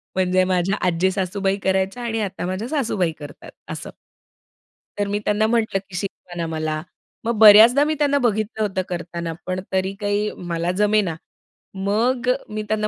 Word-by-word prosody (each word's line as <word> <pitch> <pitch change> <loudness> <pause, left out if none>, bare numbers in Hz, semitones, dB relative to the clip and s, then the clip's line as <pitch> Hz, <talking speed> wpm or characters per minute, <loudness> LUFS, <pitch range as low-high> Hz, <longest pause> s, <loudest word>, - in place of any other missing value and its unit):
म्हणजे 185 0 +2
माझ्या 185 +1 +1
आजी 180 +2 +2
सासूबाई 195 +1 -1
करायच्या 190 +5 0
आणि 225 -1 -2
आता 195 -3 -3
माझ्या 185 +6 -3
सासूबाई 220 - 0
करतात, 145 -1 -10 0.2
असं. - - -6 1.1
तर 205 - +1
मी 205 +1 -1
त्यांना 210 +1 +2
म्हटलं, 220 -4 +1
की 185 - -9
"शिकवा 180 -1 -6
ना 170 - -2
मला." 155 -1 -2 0.4
मग 230 -1 0
बऱ्याचदा 220 +6 +9
मी 310 - 0
त्यांना 285 -1 +3
बघितलं 220 -2 -1
होतं 190 -2 -1
करताना, 170 -1 -4
पण 185 0 -2
तरी 190 +1 0
काही 205 +1 0 0.2
मला 170 +1 0
जमेना. 210 -5 +2 0.6
मग 230 +6 0
अ, - - +6 0.2
मी 215 0 -4
त्यांना 215 0 0
200 Hz, 165 wpm, -22 LUFS, 185-215 Hz, 1.1 s, बऱ्याचदा